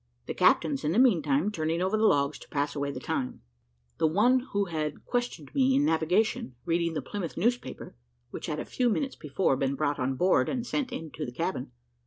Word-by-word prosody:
The - - -4
captains, 150 -3 +3
in 150 +2 +1
the - - 0
meantime, 170 - +3
turning 160 -3 -1
over 190 +4 +1
the 215 0 +4
logs 140 -2 +2
to - - -14
pass 145 0 -1
away 140 -1 -1
the 130 - -6
time; 130 -2 -3 0.6
the 160 - +4
one 225 +11 +4
who 200 0 +1
had 155 -4 -4
questioned 245 0 -3
me 265 -2 +3
in 285 +2 +3
navigation 165 - +1
reading 170 -1 0
the 150 - -2
Plymouth 175 +2 -5
newspaper, 235 - -2 0.4
which - - -6
had - - -2
a - - -4
few 250 -1 +1
minutes 270 +4 -1
before 150 0 0
been 135 +1 0
brought 145 0 -1
on 130 +1 0
board 180 +8 +3
and 250 -2 -2
sent 260 +1 -2
into 155 -1 -6
the 120 - -4
cabin. 120 - -3
165 Hz, 205 wpm, -28 LUFS, 145-220 Hz, 0.6 s, the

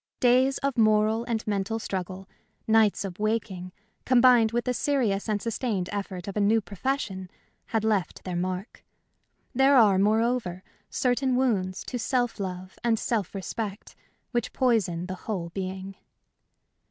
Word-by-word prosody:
Days 255 +2 +4
of 275 -3 -1
moral 215 +1 +3
and 230 -2 -2
mental 205 +1 -1
struggle, 190 -2 -5 0.4
nights 220 -2 +3
of 185 -1 -7
waking, 210 -4 -2 0.3
combined 245 -3 +5
with 240 0 -1
the 250 - 0
serious 235 -7 0
and 210 -1 +1
sustained 220 -5 -2
effort 195 -3 -5
of 200 - -5
a - - 0
new 215 +3 +4
profession, 200 -3 -3 0.4
had 225 -2 -1
left 210 -5 0
their 180 -1 -4
mark. 185 +3 -4 0.7
There 270 +2 +5
are, 205 -5 +6
moreover, 215 -3 +1 0.3
certain 255 +1 +1
wounds 200 -8 0
to 250 - -5
self 245 -1 0
love 185 -1 -6
and 230 -1 +2
self 215 -5 -2
respect 200 +1 -5 0.4
which 240 -2 -2
poison 205 -9 +1
the 185 - -5 0.2
whole 180 -5 -2
being. 190 +1 -5
215 Hz, 140 wpm, -27 LUFS, 190-240 Hz, 0.7 s, are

